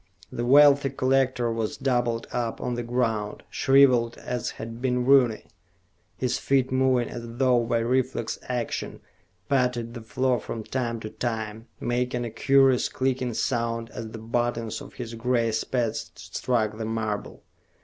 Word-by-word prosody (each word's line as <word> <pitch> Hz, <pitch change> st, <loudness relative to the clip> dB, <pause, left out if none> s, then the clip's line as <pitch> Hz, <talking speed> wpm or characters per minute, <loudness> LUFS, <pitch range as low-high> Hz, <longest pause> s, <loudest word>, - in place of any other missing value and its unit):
The 120 Hz, 0 st, -3 dB
wealthy 140 Hz, +1 st, +6 dB
collector 130 Hz, -2 st, +1 dB
was 115 Hz, -1 st, -2 dB
doubled 120 Hz, -3 st, 0 dB
up 120 Hz, -2 st, -2 dB
on 125 Hz, -, -2 dB
the 120 Hz, -, -2 dB
ground, 115 Hz, -3 st, -1 dB
shrivelled 130 Hz, -4 st, +4 dB
as 125 Hz, -1 st, -3 dB
had 115 Hz, +1 st, -7 dB
been 125 Hz, -1 st, 0 dB
Rooney. 130 Hz, -5 st, +4 dB, 0.7 s
His 125 Hz, -2 st, -1 dB
feet, 135 Hz, -2 st, +1 dB
moving 130 Hz, -2 st, +2 dB
as 120 Hz, -1 st, -8 dB
though 125 Hz, -2 st, +3 dB
by 115 Hz, 0 st, +1 dB
reflex 125 Hz, -1 st, -1 dB
action, 125 Hz, -2 st, -3 dB, 0.5 s
patted 125 Hz, -3 st, 0 dB
the 120 Hz, -, -7 dB
floor 125 Hz, +2 st, 0 dB
from 110 Hz, +1 st, -6 dB
time 120 Hz, -1 st, -2 dB
to 110 Hz, -, -6 dB
time, 110 Hz, -2 st, -4 dB
making 125 Hz, 0 st, -1 dB
a 115 Hz, -, -5 dB
curious 135 Hz, +2 st, +4 dB
clicking 130 Hz, -2 st, -1 dB
sound 115 Hz, -1 st, -1 dB
as 110 Hz, -, -6 dB
the 115 Hz, -, -8 dB
buttons 115 Hz, 0 st, -2 dB
of -, -, -11 dB
his 120 Hz, -2 st, -6 dB
gray 115 Hz, 0 st, +1 dB
spats 115 Hz, +1 st, -1 dB
struck 110 Hz, -3 st, -2 dB
the 110 Hz, -, -2 dB
marble. 110 Hz, -2 st, -3 dB
120 Hz, 150 wpm, -26 LUFS, 115-130 Hz, 0.7 s, wealthy